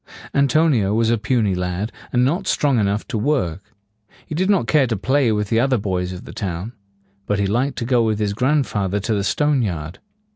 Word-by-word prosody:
An 140 Hz, 0 st, +3 dB
to 155 Hz, +5 st, +3 dB
ni 125 Hz, -10 st, +2 dB
o 100 Hz, +2 st, 0 dB
was 115 Hz, 0 st, +2 dB
a 115 Hz, -, +2 dB
puny 110 Hz, -3 st, +1 dB
lad, 90 Hz, +4 st, -2 dB, 0.2 s
and 125 Hz, 0 st, +3 dB
not 175 Hz, +8 st, -1 dB
strong 140 Hz, -5 st, +2 dB
enough 100 Hz, 0 st, 0 dB
to 115 Hz, -6 st, -2 dB
work. 105 Hz, -, -1 dB, 0.5 s
He -, -, -7 dB
did 185 Hz, +5 st, 0 dB
not 195 Hz, -, +3 dB
care 135 Hz, +3 st, +3 dB
to 115 Hz, -3 st, -1 dB
play 130 Hz, +3 st, +2 dB
with 105 Hz, -1 st, -1 dB
the 115 Hz, -, +2 dB
other 130 Hz, +1 st, +2 dB
boys 90 Hz, -3 st, -2 dB
of 90 Hz, 0 st, -8 dB
the -, -, -10 dB
town. 95 Hz, +2 st, -4 dB, 0.5 s
But 105 Hz, -, +1 dB
he 100 Hz, -, +1 dB
liked 125 Hz, +7 st, 0 dB
to 115 Hz, -, -2 dB
go 120 Hz, -1 st, +2 dB
with 110 Hz, -2 st, +1 dB
his 105 Hz, -1 st, -1 dB
grandfather 115 Hz, -6 st, 0 dB
to 105 Hz, +3 st, -1 dB
the 100 Hz, -1 st, 0 dB
stone 145 Hz, +5 st, +1 dB
yard. 85 Hz, -6 st, -4 dB
110 Hz, 225 wpm, -20 LUFS, 100-135 Hz, 0.5 s, An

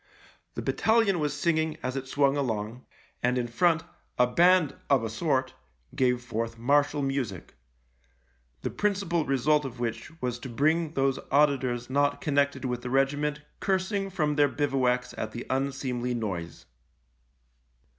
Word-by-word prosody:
The -, -, -4 dB
battalion 220 Hz, -5 st, +2 dB
was 150 Hz, -1 st, 0 dB
singing 160 Hz, +1 st, 0 dB
as 130 Hz, +1 st, -2 dB
it 135 Hz, -1 st, -4 dB
swung 140 Hz, 0 st, +2 dB
along, 115 Hz, -3 st, -3 dB, 0.3 s
and 125 Hz, +1 st, +1 dB
in 125 Hz, -, 0 dB
front 165 Hz, +7 st, +2 dB, 0.3 s
a 125 Hz, -, +5 dB
band 175 Hz, +4 st, +4 dB
of 135 Hz, -5 st, +4 dB
a 110 Hz, -, -3 dB
sort 130 Hz, 0 st, 0 dB, 0.4 s
gave 125 Hz, -1 st, +1 dB
forth 115 Hz, -1 st, -3 dB
martial 145 Hz, +4 st, +2 dB
music 135 Hz, -9 st, -3 dB, 0.5 s
— -, -, -40 dB
the -, -, -2 dB
principal 195 Hz, -6 st, 0 dB
result 145 Hz, +3 st, +2 dB
of 130 Hz, -3 st, -7 dB
which 120 Hz, +7 st, -4 dB
was 125 Hz, -3 st, -2 dB
to 130 Hz, -, -7 dB
bring 155 Hz, +6 st, +1 dB
those 135 Hz, -1 st, +1 dB
auditors 130 Hz, -4 st, +2 dB
not 145 Hz, +2 st, +1 dB
connected 140 Hz, -2 st, 0 dB
with 125 Hz, -1 st, -2 dB
the 125 Hz, -, -5 dB
regiment 145 Hz, +3 st, +1 dB, 0.2 s
cursing 195 Hz, +1 st, 0 dB
from 150 Hz, -6 st, 0 dB
their 145 Hz, -1 st, +5 dB
bivouacs 130 Hz, -4 st, 0 dB
at 110 Hz, 0 st, -4 dB
the 120 Hz, -, -6 dB
unseemly 130 Hz, -2 st, -1 dB
noise. 90 Hz, -8 st, -4 dB
135 Hz, 145 wpm, -28 LUFS, 125-150 Hz, 0.5 s, a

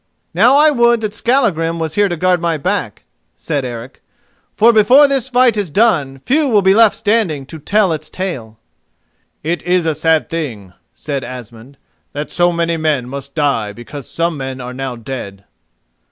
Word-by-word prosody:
"Now 230 Hz, +10 st, +5 dB
I 305 Hz, +1 st, +5 dB
would 235 Hz, -3 st, +3 dB
that 215 Hz, -2 st, -3 dB
Skallagrim 200 Hz, -, 0 dB
was 160 Hz, -2 st, -3 dB
here 205 Hz, -1 st, +2 dB
to 175 Hz, -, -3 dB
guard 180 Hz, +1 st, +1 dB
my 170 Hz, -2 st, 0 dB
back," 145 Hz, -, -3 dB, 0.3 s
said 145 Hz, -4 st, -3 dB
Eric, 120 Hz, +1 st, -8 dB, 0.5 s
"for 230 Hz, +2 st, +5 dB
before 250 Hz, +7 st, +6 dB
this 270 Hz, -2 st, -1 dB
fight 250 Hz, -2 st, +3 dB
is 200 Hz, -4 st, -2 dB
done 145 Hz, -, +1 dB
few 295 Hz, +3 st, +2 dB
will 210 Hz, -6 st, +3 dB
be 190 Hz, 0 st, +5 dB
left 220 Hz, 0 st, +5 dB
standing 200 Hz, -10 st, 0 dB
to 160 Hz, +3 st, -10 dB
tell 200 Hz, +3 st, +1 dB
its 155 Hz, 0 st, -6 dB
tale." 125 Hz, -, -5 dB, 0.9 s
"It 170 Hz, +3 st, -2 dB
is 180 Hz, -1 st, 0 dB
a 160 Hz, -, +1 dB
sad 160 Hz, +1 st, +1 dB
thing," 115 Hz, -, -5 dB, 0.2 s
said 140 Hz, -3 st, -4 dB
Asmund, 120 Hz, +1 st, -10 dB, 0.4 s
"that 145 Hz, +1 st, -5 dB
so 175 Hz, 0 st, +2 dB
many 170 Hz, -1 st, -1 dB
men 150 Hz, -6 st, -1 dB
must 140 Hz, +1 st, -8 dB
die 140 Hz, -9 st, 0 dB
because 125 Hz, +4 st, -10 dB
some 165 Hz, -1 st, -1 dB
men 135 Hz, -1 st, -5 dB
are 125 Hz, 0 st, -7 dB
now 130 Hz, -1 st, -5 dB
dead." 110 Hz, -5 st, -8 dB
165 Hz, 175 wpm, -16 LUFS, 135-205 Hz, 0.9 s, before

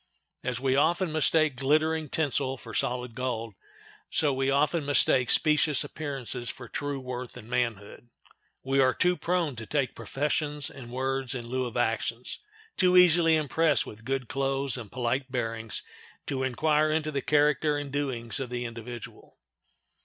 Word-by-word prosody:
As 125 Hz, -1 st, -2 dB
we 130 Hz, 0 st, +1 dB
often 170 Hz, +4 st, +2 dB
mistake 155 Hz, -1 st, +3 dB
glittering 155 Hz, +4 st, +1 dB
tinsel 140 Hz, -3 st, 0 dB
for 115 Hz, -2 st, -11 dB
solid 125 Hz, -1 st, -1 dB
gold, 115 Hz, -3 st, -3 dB, 0.6 s
so 145 Hz, -3 st, +2 dB
we 135 Hz, +1 st, 0 dB
often 150 Hz, +4 st, +2 dB
mistake 135 Hz, -3 st, +3 dB
specious 150 Hz, -2 st, +3 dB
appearances 130 Hz, -5 st, -5 dB
for 120 Hz, 0 st, -7 dB
true 145 Hz, +1 st, -3 dB
worth 125 Hz, -1 st, -6 dB
and 110 Hz, -3 st, -11 dB
manhood. 120 Hz, -2 st, -3 dB, 0.5 s
We 135 Hz, +1 st, +1 dB
are 130 Hz, -1 st, +4 dB
too 180 Hz, 0 st, +3 dB
prone 175 Hz, -6 st, -1 dB
to 110 Hz, -1 st, -7 dB
take 140 Hz, -3 st, 0 dB
professions 150 Hz, 0 st, -1 dB
and 130 Hz, -3 st, -10 dB
words 130 Hz, +1 st, -2 dB
in 120 Hz, -2 st, -5 dB
lieu 130 Hz, +2 st, -2 dB
of 120 Hz, -1 st, -5 dB
actions; 115 Hz, +1 st, -1 dB, 0.4 s
too 180 Hz, 0 st, +4 dB
easily 170 Hz, -2 st, +6 dB
impressed 155 Hz, 0 st, +2 dB
with 110 Hz, +1 st, -11 dB
good 135 Hz, 0 st, -2 dB
clothes 135 Hz, -1 st, 0 dB
and 115 Hz, -6 st, -7 dB
polite 130 Hz, +2 st, -1 dB
bearings 115 Hz, -4 st, -2 dB, 0.4 s
to 135 Hz, -2 st, -2 dB
inquire 150 Hz, +4 st, +2 dB
into 155 Hz, 0 st, 0 dB
the 140 Hz, -2 st, -1 dB
character 150 Hz, +1 st, +2 dB
and 145 Hz, -1 st, -5 dB
doings 130 Hz, -4 st, -2 dB
of 130 Hz, -2 st, -4 dB
the 120 Hz, 0 st, -3 dB
individual. 115 Hz, 0 st, -9 dB
135 Hz, 155 wpm, -28 LUFS, 125-150 Hz, 0.6 s, easily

